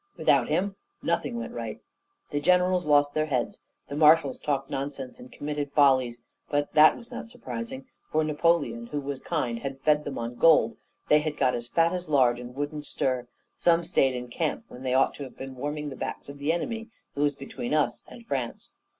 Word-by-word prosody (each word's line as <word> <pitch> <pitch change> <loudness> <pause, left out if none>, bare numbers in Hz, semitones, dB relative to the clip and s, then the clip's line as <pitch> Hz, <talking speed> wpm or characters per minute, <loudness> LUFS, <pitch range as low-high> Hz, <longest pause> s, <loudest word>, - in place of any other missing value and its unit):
without - - +3
him 195 +1 0 0.3
nothing 235 - 0
went 235 +1 -5
right; - - -5 0.5
the 145 - -1
generals 180 +1 +3
lost 145 -1 +4
their 155 0 +1
heads, 125 -5 -1 0.3
the 140 - -5
marshals 150 -2 +5
talked 140 -2 -1
nonsense 135 - -5
and 250 +1 -12
committed 145 - -4
follies; 130 -5 +3 0.3
but 145 0 0
that 155 0 +7
was 235 - -14
not - - -7
surprising, 125 - -6 0.3
for 155 0 +2
Napoleon, 150 -7 +1
who 145 - -3
was 140 -1 -5
kind, 125 -8 -1
had 135 +1 -5
fed 150 -1 +3
'em 145 - -4
on 115 +1 -3
gold; 150 -9 +5 0.3
they 150 - +6
had 150 0 -3
got 130 -2 +3
as 120 0 -4
fat 165 +6 +2
as 180 -2 -4
lard, 125 -5 +4
and 125 0 -9
wouldn't 145 +1 -4
stir; 130 -2 -1 0.3
some 170 0 +3
stayed 135 -6 +2
in 125 0 -5
camp 120 - -2
when 125 - -11
they 130 -1 0
ought 135 - +4
to 145 - -7
have 130 - -10
been 135 0 -7
warming 145 +3 -3
the - - -6
backs - - -5
of 140 0 -9
the 145 +3 +1
enemy 225 +7 -3 0.2
who 140 - -3
was 145 -1 +2
between 135 -3 -6
us 150 -1 +1
and 235 - -12
France. 130 - -4
145 Hz, 200 wpm, -27 LUFS, 130-155 Hz, 0.5 s, that